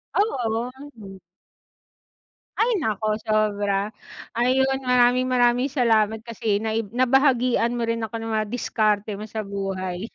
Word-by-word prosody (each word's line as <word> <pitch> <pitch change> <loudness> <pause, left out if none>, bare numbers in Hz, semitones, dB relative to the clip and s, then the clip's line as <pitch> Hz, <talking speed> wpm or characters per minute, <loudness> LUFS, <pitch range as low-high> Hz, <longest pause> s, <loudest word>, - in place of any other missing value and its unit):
Oo, 245 - 0 0.2
hmm. 195 -3 -11 1.4
Ay, 470 +2 +2
naku 215 -1 -1
sobra. 205 -1 0 0.4
Ayun 265 +3 +1
maraming-maraming 250 0 +3
salamat 225 -5 +2
kasi 225 -3 -1
naib 220 0 -2
nabahagian 250 -1 +2
mo 235 - -1
rin 230 0 -2
ako 225 +1 -4
ng 225 0 -4
mga 215 -1 -1
diskarte 215 -3 0
mo 210 +2 -7
sa 215 -2 -4
buhay. 195 0 -4
225 Hz, 120 wpm, -23 LUFS, 210-250 Hz, 1.4 s, maraming-maraming